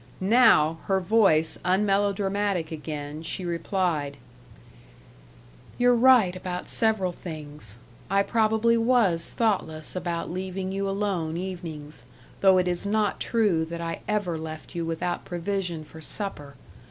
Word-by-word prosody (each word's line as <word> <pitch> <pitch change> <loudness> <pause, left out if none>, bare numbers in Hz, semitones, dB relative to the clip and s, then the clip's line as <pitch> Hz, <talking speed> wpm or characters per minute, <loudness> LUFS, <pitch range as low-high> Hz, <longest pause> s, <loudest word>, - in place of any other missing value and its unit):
Now, 190 -7 +4
her 195 -1 +2
voice 180 -6 +3
unmelodramatic 195 -2 +1
again, 150 -1 -6
she 180 +3 -4
replied: 170 -4 -1 1.6
"You're 245 0 +4
right 240 -6 +5
about 180 -1 -5
several 215 -5 +1
things. 150 - -9 0.3
I 195 +1 +3
probably 220 +1 +2
was 225 -8 +2
thoughtless 170 -9 -1
about 170 -2 -3
leaving 185 +1 -4
you 195 0 -2
alone 190 -5 -2
evenings 165 -6 -6 0.3
though 190 -1 +5
it 180 0 +2
is 175 +2 -1
not 210 0 0
true 210 -8 +1
that 170 +1 -6
I 165 0 -4
ever 205 -6 -1
left 155 +2 -8
you 170 -2 -3
without 165 +2 -2
provision 175 -2 -3
for 160 +1 -13
supper. 150 -6 -4
185 Hz, 125 wpm, -26 LUFS, 160-205 Hz, 1.6 s, right